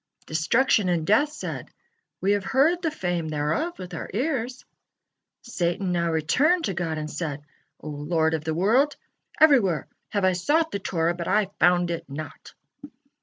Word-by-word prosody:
Destruction 195 +6 +2
and 170 -3 0
death 260 - +3
said: - - -6 0.5
"We 195 - +2
have 205 -1 +1
heard 285 - +2
the 330 - 0
fame 175 - -2
thereof 155 - -1
with 180 -1 -8
our 165 - -5
ears." 255 -1 -2 0.8
Satan 180 -4 -1
now 170 -1 0
returned 280 - +2
to 195 - -1
God 170 -3 -2
and 155 0 -4
said: 150 -2 -4 0.4
"O 155 - -8
Lord 160 +2 0
of 160 -2 -2
the 160 0 -2
world! 240 - +3 0.4
Everywhere 245 - +4 0.2
have 200 -2 0
I 185 - +4
sought 310 - +1
the 200 - -2
Torah, 170 -3 0
but 170 -1 -5
I 210 -2 +1
found 175 0 +3
it 170 - -5
not." 145 +2 -8
180 Hz, 165 wpm, -25 LUFS, 160-255 Hz, 0.8 s, Everywhere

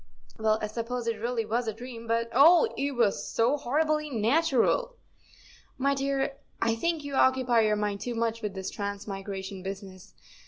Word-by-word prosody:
" - - -26
Well, 220 0 +2
I - - +2
suppose 230 +3 -4
it 225 -2 -2
really 235 -1 -1
was 230 +2 -1
a 220 - -1
dream, 230 -1 -9
but, 230 0 0
oh! 320 +6 +7
it 280 0 -1
was 230 -4 +2
so 235 +5 +2
horribly 305 +3 0
natural." 285 - +2 0.4
" - - -25
My 280 - +4
dear, 275 0 -1 0.2
I 230 0 +2
think 325 +6 -1
you 285 -1 -6
occupy 260 -3 +3
your 215 -1 +2
mind 205 -1 -2
too 245 -1 -3
much 230 0 -1
with 210 -3 -4
this 190 -1 -4
transmigration 200 -1 -5
business. 190 -1 -8
230 Hz, 180 wpm, -28 LUFS, 210-275 Hz, 0.4 s, oh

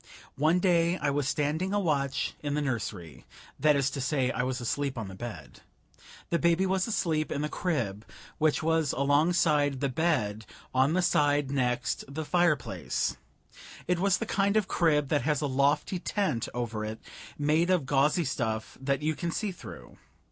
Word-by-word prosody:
One 155 +4 +4
day 175 -1 +2
I 145 -2 0
was 140 -1 0
standing 155 +6 0
a - - +3
watch 140 -7 0
in 145 -1 -2
the 150 - 0
nursery. 105 - -4 0.4
That 150 +1 +4
is 140 -1 +1
to 135 - -4
say, 135 -2 +1
I - - -1
was 130 +1 -2
asleep 135 +2 -2
on 110 -4 -4
the - - -9
bed. 115 +4 -8 0.7
The 170 - +2
baby 170 +2 +3
was 190 +1 +1
asleep 160 -8 0
in 145 - -1
the 150 - -1
crib, 115 - -2 0.4
which 155 0 +2
was 160 -3 +1
alongside 145 0 +2
the 140 0 0
bed, 125 - 0 0.3
on 130 +4 +3
the 185 +1 +2
side 145 -5 +2
next 125 -1 0
the 155 +2 -4
fireplace. 170 -5 0 0.7
It 180 0 +1
was 195 0 +3
the 230 - -3
kind 200 0 +1
of 210 -3 +1
crib 150 -6 +2
that 145 -3 +2
has 150 +3 +1
a 150 - -1
lofty 140 +6 +1
tent 180 - -1
over 115 -3 -3
it 110 +1 -5 0.4
made 155 +4 +2
of 180 -7 +2
gauzy 145 +5 +2
stuff 110 -4 -3
that 140 +1 -1
you 155 +1 +1
can 170 +2 -3
see 205 +4 -2
through. 180 - -11
145 Hz, 175 wpm, -28 LUFS, 130-170 Hz, 0.7 s, One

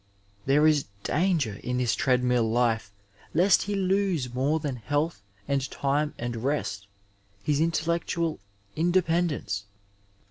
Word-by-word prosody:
There 145 +3 +4
is 150 -3 +4 0.2
danger 155 - +1
in 125 0 -1
this 125 -2 +1
treadmill 125 -3 +2
life 115 -3 +1 0.4
lest 180 +3 +5
he 205 0 -2
lose 190 -9 0
more 140 +5 +1
than 145 -4 -3
health 145 +4 -1 0.3
and 140 -1 0
time 145 +2 -1
and 120 0 -4
rest 115 -6 -2 0.3
— 100 0 -32
^his 150 0 +2
in 165 - +3
tellectual 170 0 -1 0.4
independence. 170 - +1
145 Hz, 130 wpm, -27 LUFS, 120-165 Hz, 0.4 s, lest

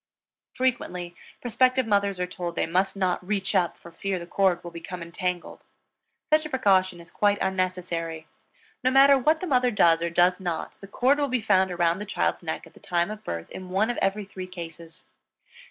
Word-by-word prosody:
Frequently, 180 -9 -2 0.3
prospective 255 +2 +2
mothers 200 -3 +1
are 180 - 0
told 175 -1 -5
they - - +1
must 185 +4 0
not 185 -2 0
"reach 195 +1 -2
up" 175 -4 +1
for 170 - -13
fear 190 +3 -3
the 170 - -7
cord 185 -1 +1
will 175 - -7
become 170 +1 -7
entangled. 180 +1 -4 0.7
Such 310 0 +5
a 305 - -6
precaution 190 -9 +2
is 170 0 -12
quite 205 -1 +2
unnecessary. 180 -4 -2 0.6
No 255 - +4
matter 275 +1 +7
what 305 +5 +2
the - - -2
mother 255 -6 +3
does, 170 -7 +4
or 170 - 0
does 175 +2 +3
not, 175 -4 -4
the 195 - -9
cord 260 +8 +2
will 285 - +1
be 255 -2 0
found 190 -4 +3
around 175 0 +1
the 210 - -5
child's 205 - -1
neck 160 -2 -4
at - - -17
the - - -17
time 175 -1 -1
of 215 0 -8
birth 85 -1 -5
in 185 -1 -8
one 205 +5 +1
of - - -6
every 195 +1 0
three 185 -1 -8
cases. 170 -1 -10
185 Hz, 200 wpm, -26 LUFS, 175-210 Hz, 0.7 s, matter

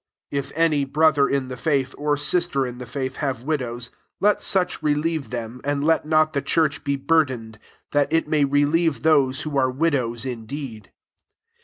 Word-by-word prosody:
16 140 - 0
If 140 +2 -8
any 155 -4 +3
[brother 145 0 +3
in 140 -2 0
the 130 - -6
faith, 135 -1 0
or] 145 0 0
sister 150 -1 +1
in 125 0 -7
the 125 - -7
faith, 130 -2 -4
have 135 -5 -2
wick>ws, 125 -5 -3 0.3
let 210 +1 +3
such 185 -4 +1
relieve 155 0 0
them, 120 0 -6
and 145 0 -1
let 160 0 +2
not 155 0 +3
the 140 - 0
church 155 -2 +1
be 140 0 0
burdened; 130 -7 0 0.3
that 145 0 +1
it 165 -1 +2
may 150 -1 +2
relieve 145 +3 +1
those 145 -3 +3
wio 145 -2 -1
are 130 -1 +2
widows 130 -5 0
indeed. 120 -2 -7
140 Hz, 175 wpm, -23 LUFS, 130-155 Hz, 0.3 s, any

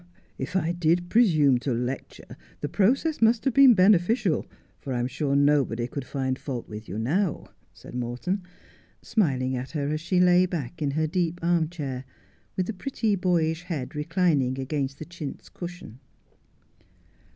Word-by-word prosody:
' - - -36
If 180 - -10
I 170 -3 +1
did 175 +1 +1
presume 155 - +4
to 130 - -2
lecture 125 +3 -4 0.3
the 145 - -1
process 260 - +1
must 225 +2 +3
have 270 - +2
been 265 -2 +8
beneficial, 190 0 +3 0.3
for 135 - -5
I'm 120 -1 0
sure 140 +2 -1
nobody 140 -5 +2
could 130 +2 -5
find 130 -1 -2
fault 125 -5 -5
with 110 +1 -9
you 95 - -4
now,' 160 - -1 0.2
said - - -13
Morton, 125 +11 -2 0.6
smiling 130 - +1
at 125 +1 -4
her 140 -1 -1
as 155 +1 -2
she 180 +2 +1
lay 180 0 +5
back 165 -2 -5
in 145 - +1
her 155 - +2
deep 170 +1 -1
arm 170 -2 +2
chair, 135 -7 -5 0.5
with 185 - +1
the 225 - -4
pretty 215 +1 -1
boyish 170 -3 +1
head 150 -8 -4
reclining 150 -5 +1
against 135 0 -2
the 155 - -7
chintz 170 -4 -8
cushion. 175 -9 -9
160 Hz, 160 wpm, -26 LUFS, 130-180 Hz, 0.6 s, been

